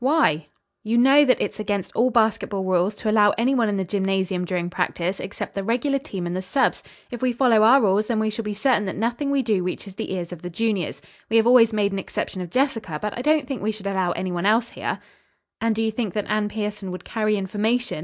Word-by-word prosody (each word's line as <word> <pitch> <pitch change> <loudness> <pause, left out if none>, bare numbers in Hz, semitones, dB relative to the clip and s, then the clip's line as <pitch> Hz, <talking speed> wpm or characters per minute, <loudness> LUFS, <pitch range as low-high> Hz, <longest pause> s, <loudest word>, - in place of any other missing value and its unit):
"Why?" 255 - +2 0.4
"You 225 +2 0
know 270 +4 +6
that 255 - +3
it - - -1
is - - -17
against 205 -2 -2
all 245 +3 +3
basketball 220 -4 +1
rules 185 +2 +1
to 215 - -3
allow 210 -1 +4
any 245 +4 +2
one 235 -5 +2
in 205 - -1
the 190 - 0
gymnasium 190 -1 -1
during 175 -1 -2
practice 180 +1 -2
except 195 - -6
the 195 - -3
regular 255 +6 0
team 200 - -6
and 175 +1 -3
the 185 - -2
subs. 260 +9 0 0.3
If 240 - -6
we 255 -1 +2
follow 240 -3 +3
our 235 +6 +7
rules 210 -2 +2
then 230 -3 0
we 220 0 0
shall 215 - -4
be 210 -1 -4
certain 215 -1 +2
that 190 - -4
nothing 240 +7 -1
we 280 -1 +1
do 210 -6 +1
reaches 185 +2 -5
the 190 - -5
ears 175 -1 -5
of 175 -2 -8
the 180 - -6
juniors. 200 -1 -2 0.3
We 225 - +3
have 225 - +4
always 235 -2 +6
made 205 -2 +1
an 195 - -2
exception 185 0 -4
of 180 - -6
Jessica, 225 - -1
but 210 -1 -4
I 245 - -4
don't 300 +1 +2
think 270 -2 -4
we 215 - 0
should 210 -2 -10
allow 190 -2 0
any 185 -1 -3
one 175 +2 -1
else 230 +2 +2
here." - - -3 0.6
"And 225 -1 +1
do 225 - 0
you 220 - 0
think 220 -4 -3
that 210 - -1
Anne 210 0 0
Pierson 210 -2 -4
would 180 0 -7
carry 215 -2 0
information?" 215 +3 -1
210 Hz, 250 wpm, -23 LUFS, 190-235 Hz, 0.6 s, our